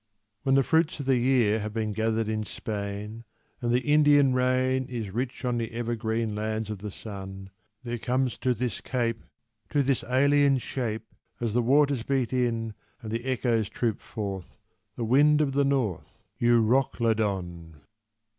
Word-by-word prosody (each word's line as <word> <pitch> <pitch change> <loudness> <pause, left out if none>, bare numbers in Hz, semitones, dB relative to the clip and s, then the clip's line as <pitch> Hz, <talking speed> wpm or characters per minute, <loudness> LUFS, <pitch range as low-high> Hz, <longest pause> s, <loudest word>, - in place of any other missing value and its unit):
When 135 +2 +2
the 135 - +5
fruits 160 +2 +1
of 140 - -4
the 135 -1 +3
year 120 -4 +3
Have 105 0 -4
been 110 -2 -1
gathered 110 0 0
in 110 0 -1
Spain, 105 +1 -5 0.4
And 120 -1 0
the 125 +1 +3
Indian 145 -2 +5
rain 130 0 +1
Is 115 -6 -5
rich 120 +2 -3
on 120 -1 0
the 115 -1 -3
evergreen 115 -1 -2
lands 110 0 -2
of 105 - -5
the 105 +1 -5
Sun, 95 -2 -8 0.3
There 120 -1 -4
comes 125 +2 -1
to 125 -1 +1
this 125 0 -3
Cape 115 -3 -2 0.5
To 145 -1 +2
this 135 -1 0
alien 140 +2 +4
Shape, 115 -3 -3 0.3
As 115 -3 -2
the 120 - +3
waters 140 +1 +3
beat 130 0 -1
in 115 -3 0 0.3
and 110 - -6
the 115 +2 -3
echoes 120 -5 0
troop 115 -3 -2
forth, 100 -5 -6 0.4
The 115 - -3
Wind 145 +6 +5
of 150 -3 +2
the 140 +1 +2
North, 130 - -2 0.2
Euroclydon! 110 -8 +1
120 Hz, 160 wpm, -27 LUFS, 110-130 Hz, 0.5 s, the